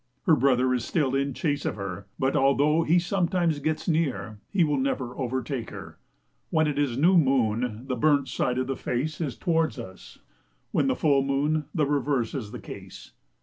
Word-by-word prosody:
Her 160 Hz, -, +5 dB
brother 130 Hz, -1 st, +3 dB
is 125 Hz, -3 st, -1 dB
still 135 Hz, +2 st, 0 dB
in 135 Hz, -1 st, 0 dB
chase 145 Hz, -3 st, -1 dB
of -, -, -2 dB
her, 100 Hz, -1 st, -6 dB
but 130 Hz, +1 st, 0 dB
although 145 Hz, +3 st, +3 dB
he 165 Hz, +2 st, +3 dB
sometimes 175 Hz, -3 st, +1 dB
gets 155 Hz, +2 st, -2 dB
near, 145 Hz, -, -1 dB
he 185 Hz, -, +2 dB
will 150 Hz, -3 st, +1 dB
never 130 Hz, -2 st, -2 dB
overtake 130 Hz, -1 st, -3 dB
her. -, -, -10 dB, 0.5 s
When 160 Hz, -1 st, +2 dB
it 145 Hz, -1 st, -1 dB
is 135 Hz, -5 st, 0 dB
new 175 Hz, +6 st, +5 dB
moon, 125 Hz, -4 st, +1 dB
the 130 Hz, -2 st, -2 dB
burnt 140 Hz, +2 st, +2 dB
side 125 Hz, 0 st, -1 dB
of 130 Hz, -, 0 dB
the 135 Hz, +1 st, -2 dB
face 150 Hz, +8 st, -3 dB
is 140 Hz, -7 st, -3 dB
towards 165 Hz, -4 st, 0 dB
us; 95 Hz, -6 st, -10 dB, 0.5 s
when -, -, +2 dB
full 145 Hz, -, +3 dB
moon, 145 Hz, +3 st, 0 dB
the 155 Hz, -3 st, +2 dB
reverse 140 Hz, -4 st, 0 dB
is 120 Hz, -7 st, -4 dB
the -, -, -6 dB
case. -, -, -10 dB
140 Hz, 185 wpm, -26 LUFS, 125-155 Hz, 0.5 s, Her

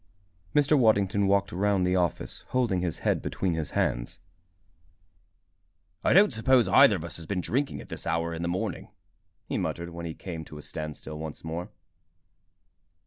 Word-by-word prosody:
Mr. 145 Hz, +1 st, +5 dB
Waddington 100 Hz, -5 st, +3 dB
walked 100 Hz, 0 st, +2 dB
round 95 Hz, +1 st, +1 dB
the 90 Hz, +1 st, +2 dB
office, 90 Hz, -3 st, -1 dB
holding 120 Hz, -8 st, +1 dB
his 85 Hz, -3 st, -2 dB
head -, -, +2 dB
between 95 Hz, -3 st, -1 dB
his 80 Hz, -2 st, -2 dB
hands. -, -, -1 dB, 1.9 s
"I -, -, +3 dB
don't 195 Hz, -5 st, +6 dB
suppose 120 Hz, +2 st, +3 dB
either 135 Hz, -7 st, +7 dB
of 85 Hz, -, -5 dB
us 85 Hz, -2 st, -5 dB
has 80 Hz, -, -9 dB
been 100 Hz, -2 st, -1 dB
drinking 135 Hz, +9 st, -1 dB
at -, -, -13 dB
this -, -, -6 dB
hour 85 Hz, +1 st, 0 dB
in 80 Hz, -, -5 dB
the 85 Hz, -, -1 dB
morning," 95 Hz, +3 st, -3 dB, 0.6 s
he -, -, -2 dB
muttered, 85 Hz, 0 st, -3 dB
when 85 Hz, 0 st, -6 dB
he 80 Hz, -, -6 dB
came 85 Hz, -4 st, -6 dB
to 75 Hz, -, -11 dB
a 75 Hz, -, -9 dB
standstill 75 Hz, 0 st, -6 dB
once 80 Hz, -1 st, -7 dB
more. 80 Hz, +2 st, -5 dB
90 Hz, 170 wpm, -27 LUFS, 80-105 Hz, 1.9 s, either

